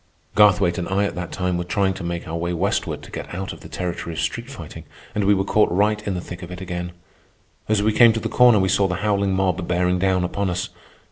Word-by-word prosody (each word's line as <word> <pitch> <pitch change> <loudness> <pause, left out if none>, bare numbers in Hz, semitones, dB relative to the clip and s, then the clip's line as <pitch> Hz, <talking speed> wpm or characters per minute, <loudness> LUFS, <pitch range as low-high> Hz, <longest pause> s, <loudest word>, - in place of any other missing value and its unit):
Garthwaite 100 -4 +4
and 90 - -4
I 100 +1 +1
at - - -2
that 90 -1 -5
time 90 -1 -1
were - - -1
trying 95 +2 0
to 95 - -8
make 85 0 -4
our 80 - -4
way 85 +1 -2
westward 95 +4 -1
to - - -12
get - - -6
out 95 +1 -4
of - - -12
the - - -12
territory 85 -2 -4
of - - -4
street 120 +10 -3
fighting, 85 - -9 0.3
and 105 - 0
we 100 +1 +5
were 95 - +1
caught 105 +1 +3
right 105 +3 +2
in 100 - -1
the 90 - -3
thick 90 0 -9
of 90 - -8
it 90 0 -7
again. 90 -1 -5 0.8
As 105 -1 +2
we 110 0 +2
came 120 0 +7
to 115 - -1
the - - -3
corner 125 -3 +5
we 95 -1 +2
saw 100 +1 +3
the 90 - -2
howling 100 -2 +1
mob 95 -2 0
bearing 90 +1 +1
down 95 -1 +2
upon 95 +2 -1
us. 90 0 -2
95 Hz, 260 wpm, -22 LUFS, 90-100 Hz, 0.8 s, came